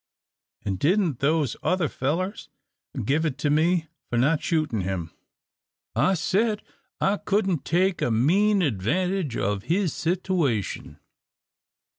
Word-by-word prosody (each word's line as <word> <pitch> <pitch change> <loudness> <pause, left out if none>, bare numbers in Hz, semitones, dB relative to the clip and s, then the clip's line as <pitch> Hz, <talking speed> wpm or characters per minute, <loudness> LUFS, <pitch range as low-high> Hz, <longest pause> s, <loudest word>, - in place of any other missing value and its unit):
An' 95 -2 -1
didn't 165 - +1
those 150 0 +1
other 180 -3 +1
fellers 170 - -2 0.6
give 145 +7 +1
it 150 -5 -1
to 145 0 0
me 165 +2 +2 0.2
for 120 - -1
not 145 +6 +3
shootin' 155 - 0
him! 90 -3 -3 0.8
I 150 +12 +3
said 210 +6 0 0.4
I 200 +2 +2
couldn't 195 -7 0
take 185 +2 +1
a - - +1
mean 185 - +3
advantage 155 - 0
of 100 0 -1
his 180 0 +1
sitooation." 170 - -1
160 Hz, 120 wpm, -25 LUFS, 130-185 Hz, 0.8 s, not